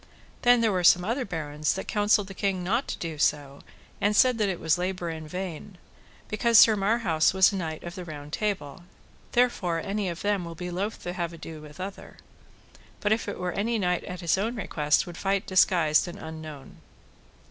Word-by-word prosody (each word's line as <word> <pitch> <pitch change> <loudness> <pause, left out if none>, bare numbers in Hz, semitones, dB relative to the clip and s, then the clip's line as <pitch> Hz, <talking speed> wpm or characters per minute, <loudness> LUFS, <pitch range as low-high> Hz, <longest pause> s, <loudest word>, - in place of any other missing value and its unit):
Then 245 -1 +5
there 225 -2 +3
were 180 -2 0
some 175 +1 +6
other 245 +5 -1
barons 155 -4 -2
that 190 - -5
counselled 205 -1 +2
the 195 - -9
king 190 -1 -1
not 230 +9 0
to - - -4
do 160 -3 -5
so, 145 -1 0 0.4
and 205 +1 +2
said 250 +1 +4
that 210 -2 +2
it 180 - -3
was 160 +2 +1
labour 180 -2 -2
in 160 -1 -7
vain, 180 +2 -6 0.5
because 230 +2 +3
Sir 220 -1 +8
Marhaus 195 -6 +2
was 190 +1 +6
a - - -4
knight 160 -4 -4
of 170 - -6
the 185 -1 -7
Round 150 -3 -9
Table, 190 -6 -3 0.5
therefore 205 -9 +2
any 195 +2 -2
of 170 +2 -6
them 205 -2 +1
will 170 -1 -7
be 180 +1 -6
loath 200 +5 -4
to 175 - -4
have 170 -2 -3
ado 160 -1 -9
with 150 +2 -13
other, 190 +1 -8 0.8
but 205 - 0
if 220 +1 +1
it - - -5
were 180 0 -2
any 225 +6 -1
knight 180 -3 0
at 180 0 -7
his 170 +2 +1
own 225 +5 -1
request 150 -8 +1
would 175 -1 -9
fight 195 0 0
disguised 175 -4 +3
and 175 - -7
unknown. 155 -3 -9
180 Hz, 200 wpm, -27 LUFS, 160-205 Hz, 0.8 s, Sir